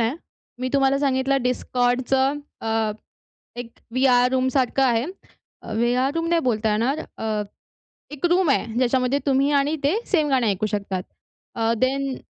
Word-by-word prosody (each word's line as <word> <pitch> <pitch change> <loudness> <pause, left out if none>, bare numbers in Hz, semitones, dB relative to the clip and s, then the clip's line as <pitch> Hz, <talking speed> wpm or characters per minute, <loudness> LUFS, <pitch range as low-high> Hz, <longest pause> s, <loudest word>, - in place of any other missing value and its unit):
आहे. 230 +3 +1 0.5
मी 255 - -1
तुम्हाला 275 0 +3
सांगितलं 270 -1 +1
Discordचं 255 +2 +1 0.2
अ, 225 -1 0 0.7
एक 245 -1 -6 0.2
व्हीआर 250 -1 +3
रूम 260 0 +1
सारखं 270 0 +2
आहे. 240 -3 +2 0.7
व्हीआर 245 +4 +1
रूम 330 0 -1
नाही 340 0 +2
बोलता 220 -3 0
येणार. 235 +8 0 0.2
अ, 215 -1 -1 0.7
एक 295 +3 -3
रूम 355 -2 +3
आहे, 275 - +2
ज्याच्यामध्ये 255 +2 +1
तुम्ही 275 +1 +2
आणि 290 +3 0
ते 290 +7 +2
सेम 310 -6 +1
गाणं 260 -4 +2
ऐकू 205 +1 0
शकतात. 200 -3 -3 0.5
अ, 225 0 +1
देन 270 +2 0
255 Hz, 145 wpm, -23 LUFS, 235-275 Hz, 0.7 s, तुम्हाला